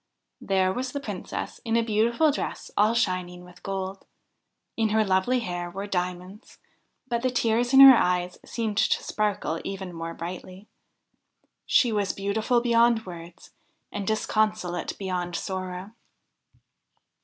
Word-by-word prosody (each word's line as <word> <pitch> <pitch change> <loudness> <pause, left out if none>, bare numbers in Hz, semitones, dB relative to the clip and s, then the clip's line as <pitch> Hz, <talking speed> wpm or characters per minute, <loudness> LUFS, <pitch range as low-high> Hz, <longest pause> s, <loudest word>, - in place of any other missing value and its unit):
There 190 -1 +1
was 255 +2 -4
the 285 - -2
Princess 205 -9 -6
in 230 0 +1
a 230 - +2
beautiful 235 +7 +2
dress 285 - -5
all 215 +3 +3
shining 180 -5 -1
with 180 0 -16
gold. 195 0 -5 0.7
In 225 -1 +1
her 215 0 +2
lovely 195 +6 +2
hair 175 -4 -4
were 195 +3 -5
diamonds, 180 +2 -5 0.5
but 235 -2 -1
the 255 - +1
tears 240 0 +1
in 270 0 +8
her 270 -1 +11
eyes 180 -3 0
seemed 220 -3 -3
to - - +2
sparkle 205 -6 -1
even 190 -2 -6
more 165 0 -6
brightly. 185 +3 -8 1.0
She 245 - +4
was 205 -3 0
beautiful 215 +5 0
beyond 235 -1 +3
words, 170 -1 -11 0.4
and 200 -2 -4
disconsolate 215 -4 -1
beyond 180 -3 -3
sorrow. 185 +1 -5
200 Hz, 135 wpm, -26 LUFS, 180-230 Hz, 1.0 s, her